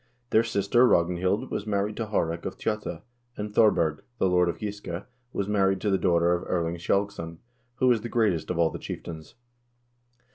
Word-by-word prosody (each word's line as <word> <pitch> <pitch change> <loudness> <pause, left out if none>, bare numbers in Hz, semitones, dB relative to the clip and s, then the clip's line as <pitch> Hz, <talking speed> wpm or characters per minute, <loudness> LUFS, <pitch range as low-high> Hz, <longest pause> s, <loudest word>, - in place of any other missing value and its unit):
Their 110 - +6
sister 115 +2 +3
Ragnhild 90 +1 +1
was 105 - -3
married 105 0 0
to 115 - -2
Haarek 85 -5 -1
of - - -7
Tjotta, 105 -6 -3 0.3
and 105 0 -5
Thorberg, 85 -9 +3 0.2
the 95 - +2
lord 90 -1 +3
of - - -3
Giske, 100 -4 -5 0.3
was 100 - -2
married 95 -2 +2
to 105 - +1
the 95 - +2
daughter 85 -1 +3
of 90 - -1
Erling 85 -1 0
Skjalgsson, 85 -3 -1 0.4
who 130 - 0
was 120 -3 +4
the 120 - -5
greatest 105 -10 +1
of 90 - -1
all 85 -1 +3
the - - -6
chieftains. 80 -2 -8
95 Hz, 180 wpm, -27 LUFS, 85-105 Hz, 0.4 s, Their